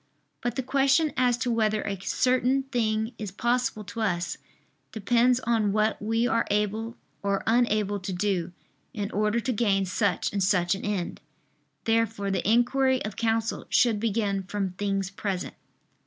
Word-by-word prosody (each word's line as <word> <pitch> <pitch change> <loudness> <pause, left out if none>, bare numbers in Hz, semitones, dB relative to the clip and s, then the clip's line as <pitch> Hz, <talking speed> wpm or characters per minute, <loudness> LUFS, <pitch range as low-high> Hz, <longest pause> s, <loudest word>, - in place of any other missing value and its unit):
But 240 - -2
the 265 - -2
question 275 +4 +2
as 250 -2 +2
to 245 0 -1
whether 215 -2 +1
a 195 -2 -4
certain 255 +4 +1
thing 225 -3 -1
is 210 -2 -4
possible 240 +1 0
to 225 +3 -6
us, 175 -5 -1 0.5
depends 240 +2 +2
on 220 -4 +1
what 215 +1 +1
we 225 +3 +1
are 230 -1 +1
able 210 +3 -1 0.2
or 200 -1 -1
unable 215 -3 +2
to 190 +1 -5
do, 180 -2 -1 0.4
in 205 -1 -3
order 210 +3 +1
to 255 - -1
gain 200 -3 +1
such 200 +1 0
and 200 -1 0
such 180 -2 +2
an 195 - -5
end. 200 -4 -3 0.6
Therefore 225 -3 0
the 195 +1 0
inquiry 260 +2 +2
of 210 -2 -5
counsel 225 0 -1
should 230 -4 +3
begin 205 -3 0
from 195 0 -3
things 195 0 -2
present. 195 -2 -3
215 Hz, 155 wpm, -27 LUFS, 200-235 Hz, 0.6 s, should